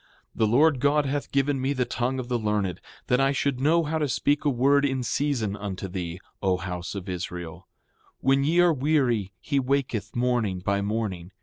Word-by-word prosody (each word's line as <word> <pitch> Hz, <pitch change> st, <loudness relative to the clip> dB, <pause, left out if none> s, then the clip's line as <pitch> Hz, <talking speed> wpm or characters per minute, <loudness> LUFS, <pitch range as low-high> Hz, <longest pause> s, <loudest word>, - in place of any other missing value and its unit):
7:4 -, -, -19 dB
The 110 Hz, -, +4 dB
Lord 140 Hz, +5 st, +4 dB
God 145 Hz, +2 st, +3 dB
hath 140 Hz, +1 st, -2 dB
given 140 Hz, -1 st, +1 dB
me 135 Hz, +2 st, 0 dB
the 130 Hz, -2 st, 0 dB
tongue 125 Hz, +2 st, -2 dB
of 130 Hz, -2 st, -4 dB
the 120 Hz, -1 st, 0 dB
learned, 105 Hz, -4 st, -1 dB, 0.2 s
that 125 Hz, -, +2 dB
I 135 Hz, 0 st, +3 dB
should 140 Hz, -2 st, 0 dB
know 160 Hz, +5 st, +3 dB
how 160 Hz, +1 st, -1 dB
to 150 Hz, -2 st, 0 dB
speak 145 Hz, +4 st, +1 dB
a -, -, +4 dB
word 140 Hz, +2 st, +3 dB
in 135 Hz, -2 st, 0 dB
season 120 Hz, -5 st, -1 dB
unto 100 Hz, -2 st, -5 dB
thee, 90 Hz, -1 st, -5 dB, 0.2 s
O 95 Hz, -2 st, +2 dB
house 90 Hz, 0 st, -5 dB
of 95 Hz, -2 st, -6 dB
Israel. 90 Hz, -2 st, -6 dB, 0.5 s
When 135 Hz, +1 st, +2 dB
ye 165 Hz, +5 st, +3 dB
are 175 Hz, -2 st, +5 dB
weary 130 Hz, -8 st, +1 dB
he 140 Hz, -2 st, 0 dB
waketh 125 Hz, -6 st, -1 dB
morning 120 Hz, -6 st, +1 dB
by 100 Hz, +2 st, 0 dB
morning. 100 Hz, -4 st, -3 dB
125 Hz, 200 wpm, -26 LUFS, 100-140 Hz, 0.5 s, are